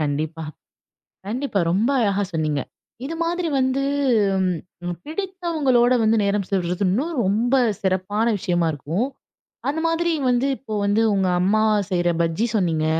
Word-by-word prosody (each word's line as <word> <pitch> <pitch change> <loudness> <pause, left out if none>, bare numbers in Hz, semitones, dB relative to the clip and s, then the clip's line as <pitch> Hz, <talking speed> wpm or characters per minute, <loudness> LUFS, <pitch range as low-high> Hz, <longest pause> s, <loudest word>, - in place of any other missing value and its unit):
கண்டிப்பா. 155 +2 -2 0.9
கண்டிப்பா 240 -1 -1
ரொம்ப 210 +7 +2
அழகா 205 -2 +1
சொன்னீங்க. 155 -3 0 0.5
இது 325 +4 -4
மாதிரி 345 0 -1
வந்து 260 +1 +1 1.0
ம் 175 -2 -3
பிடித்தவங்களோட 315 -8 +1
வந்து 220 +1 +3
நேரம் 200 0 0
செலவிடுறது 180 0 0
இன்னும் 275 - 0
ரொம்ப 220 +6 +1 0.3
சிறப்பான 190 +3 0
விஷயமா 175 -2 0
இருக்கும். 165 - -2 0.6
அந்த 300 +3 -1
மாதிரி 335 +1 +1 0.2
வந்து 245 +2 +2
இப்போ 240 -5 -10
வந்து 205 +2 +2
உங்க 190 -1 +1
அம்மா 210 +4 +2 0.3
செய்ற 175 -1 +1
பஜ்ஜி 165 +8 0
சொன்னீங்க. 165 -5 +1
205 Hz, 130 wpm, -22 LUFS, 180-265 Hz, 1.0 s, வந்து